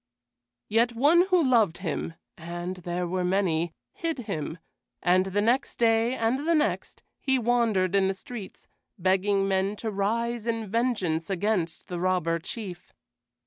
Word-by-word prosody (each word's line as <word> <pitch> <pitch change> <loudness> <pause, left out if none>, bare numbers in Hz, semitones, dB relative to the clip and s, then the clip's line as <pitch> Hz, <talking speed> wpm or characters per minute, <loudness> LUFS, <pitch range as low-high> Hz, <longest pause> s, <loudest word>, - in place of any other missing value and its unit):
Yet 235 +2 +2
one 315 +9 +4
who 365 -3 +4
loved 230 - +3
him 165 -2 -3 0.2
and 175 +2 -5
there 175 0 -3
were 180 +1 -1
many 180 -3 +1 0.2
hid 330 -2 -2
him; 160 -1 -4 0.5
and 185 +2 +3
the 200 +2 0
next 245 +5 +1
day 230 +1 +3
and 260 +7 0
the 335 - +4
next 300 -1 -1 0.2
he 265 -1 +1
wandered 225 -6 +2
in 195 -1 +4
the 195 - -1
streets, 215 0 -9 0.3
begging 195 +2 +2
men 195 +1 +1
to 220 +1 -4
rise 230 +3 -1
in 225 -1 -1
vengeance 200 -7 0
against 190 -3 -1
the 175 -1 -4
Robber 175 -2 +1
Chief. 180 0 -7
200 Hz, 145 wpm, -27 LUFS, 180-235 Hz, 0.5 s, one